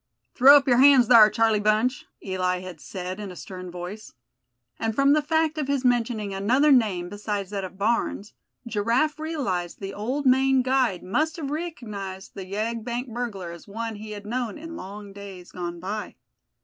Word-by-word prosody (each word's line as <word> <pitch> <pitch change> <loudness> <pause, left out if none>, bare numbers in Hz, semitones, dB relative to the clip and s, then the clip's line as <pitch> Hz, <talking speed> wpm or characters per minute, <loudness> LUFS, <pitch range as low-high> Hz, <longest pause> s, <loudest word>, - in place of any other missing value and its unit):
"Throw 275 +3 +8
up 275 - 0
yer 245 -2 +4
hands 265 -3 +6
thar, 225 -3 +9
Charlie 225 -2 +2
Bunch!" 215 +5 +1 0.2
Eli 185 -1 -1
had 185 -4 -9
said 185 +1 -6
in 205 -2 -6
a 180 - -9
stern 185 0 -8
voice; 180 +5 -8 0.7
and 225 -1 -1
from 275 +2 +4
the 305 - +3
fact 315 +1 0
of 290 - -2
his 275 -2 -1
mentioning 230 -4 +1
another 250 +10 +3
name 205 -9 +3
besides 205 0 -4
that 200 -1 -3
of 185 0 -8
Barnes, 210 -1 -1 0.3
Giraffe 235 +8 0
realized 250 - -3
the 195 0 -6
old 255 +8 -3
Maine 265 0 +4
guide 255 -8 +1
must 305 +12 0
have 285 -4 -4
recognized 215 - -6
the 195 - -7
yegg 220 +3 -3
bank 240 0 -4
burglar 210 -8 -4
as 170 +4 -12
one 225 +1 -5
he 215 +1 -9
had 205 -1 -8
known 235 0 -3
in 330 +2 -8
long 200 -3 -9
days 195 -3 -10
gone 175 -1 -5
by. 205 +4 -5
215 Hz, 180 wpm, -25 LUFS, 195-260 Hz, 0.7 s, thar